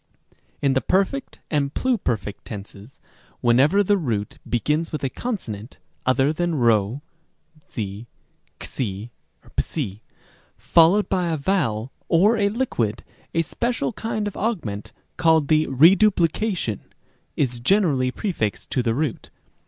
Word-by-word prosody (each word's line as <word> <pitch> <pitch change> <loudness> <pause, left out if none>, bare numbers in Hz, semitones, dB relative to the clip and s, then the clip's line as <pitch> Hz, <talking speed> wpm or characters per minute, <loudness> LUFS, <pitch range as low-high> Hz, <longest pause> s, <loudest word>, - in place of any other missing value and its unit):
b. - - -32 0.3
In 140 -1 +3
the 130 - +2
perfect 195 +9 0
and 140 -2 0
pluperfect 125 - -1
tenses, 105 +2 -10 0.4
whenever 135 +12 +4
the 205 0 +2
root 110 - -3
be 120 - +1
gins 155 +6 0
with 150 -3 -4
a 135 - -1
consonant 120 - -5 0.3
(other 135 +3 +3
than 175 +1 -1 1.2
p, 105 +1 -5 0.5
¢ 105 -2 -4 0.4
ἕξ, - - -3
w) 105 - -3 0.6
followed 175 +5 +4
by 180 -2 0
a 160 - 0
vowel 140 - 0 0.2
or 195 +7 +5
a 205 -2 +2
liquid, 125 - -1 0.3
a 165 - +3
special 235 +8 -2
kind 215 -1 -3
of 205 - -5
augment 115 - -3 0.3
called 160 -3 +3
the 155 0 +3
reduplication 170 - +3 0.6
is 125 -4 0
generally 140 - +2
prefixed 125 - -3
to 130 - +1
the 115 -2 0
root. 145 -3 -2
150 Hz, 130 wpm, -23 LUFS, 120-195 Hz, 1.2 s, or